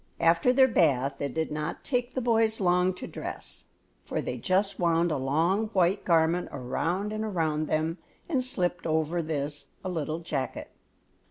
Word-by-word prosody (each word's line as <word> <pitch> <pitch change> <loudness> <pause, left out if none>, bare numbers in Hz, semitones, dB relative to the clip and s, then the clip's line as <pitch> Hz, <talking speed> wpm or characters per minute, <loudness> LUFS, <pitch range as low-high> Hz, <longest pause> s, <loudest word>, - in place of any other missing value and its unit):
After 165 +8 +4
their 260 +1 +6
bath 140 - +2
it 140 -3 -3
did 160 -1 -1
not 150 +2 -4
take 245 -1 -1
the 260 - 0
boys 225 -2 +2
long 180 -1 +3
to - - -7
dress, - - -6 0.4
for - - -3
they 125 - -3
just 190 - 0
wound 170 -1 +2
a - - +1
long 165 +11 +1
white 185 0 +2
garment 165 +1 +2
around 170 +10 -2
and 215 0 -2
around 160 -7 0
them, 160 +3 -1 0.3
and 270 -6 +1
slipped 180 -9 -1
over 160 +2 +1
this 145 -2 -3 0.2
a - - -1
little 160 -3 -2
jacket. 155 -6 -4
170 Hz, 165 wpm, -28 LUFS, 155-195 Hz, 0.4 s, their